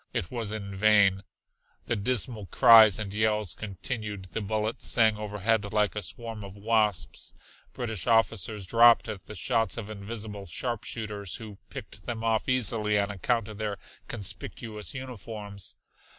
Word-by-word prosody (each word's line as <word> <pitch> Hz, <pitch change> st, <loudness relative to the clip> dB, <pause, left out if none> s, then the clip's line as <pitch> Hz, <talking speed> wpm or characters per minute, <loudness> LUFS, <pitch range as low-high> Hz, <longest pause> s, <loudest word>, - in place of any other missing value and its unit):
It 85 Hz, -, -2 dB
was 115 Hz, -4 st, -3 dB
in 100 Hz, -2 st, -4 dB
vain. 100 Hz, -2 st, +4 dB, 0.6 s
The -, -, 0 dB
dismal 110 Hz, -1 st, -1 dB
cries 110 Hz, -2 st, +8 dB
and 105 Hz, -2 st, -4 dB
yells 105 Hz, -3 st, +2 dB
continued. 105 Hz, -1 st, -5 dB
The 110 Hz, -, -1 dB
bullets 110 Hz, +2 st, -2 dB
sang 110 Hz, -2 st, +4 dB
overhead 105 Hz, +1 st, 0 dB
like 105 Hz, -1 st, +2 dB
a 105 Hz, -, -2 dB
swarm 110 Hz, +4 st, -6 dB
of 100 Hz, +1 st, -10 dB
wasps, 105 Hz, -2 st, 0 dB, 0.4 s
British 110 Hz, -5 st, -3 dB
officers 110 Hz, -3 st, +2 dB
dropped 115 Hz, +4 st, +6 dB
at 105 Hz, -3 st, -7 dB
the 105 Hz, -, -8 dB
shots 115 Hz, +5 st, 0 dB
of 110 Hz, -2 st, -5 dB
invisible 105 Hz, -1 st, -6 dB
sharpshooters, 105 Hz, -1 st, -4 dB
who 105 Hz, -4 st, -9 dB
picked -, -, -10 dB
them 115 Hz, -1 st, -3 dB
off 110 Hz, +1 st, +1 dB
easily 110 Hz, -4 st, +2 dB
on 100 Hz, 0 st, +1 dB
account 115 Hz, +3 st, 0 dB
of 110 Hz, -1 st, -9 dB
their 105 Hz, -2 st, -2 dB, 0.3 s
conspicuous 105 Hz, +2 st, -5 dB
uniforms. 110 Hz, -6 st, -7 dB
110 Hz, 145 wpm, -28 LUFS, 100-115 Hz, 0.6 s, cries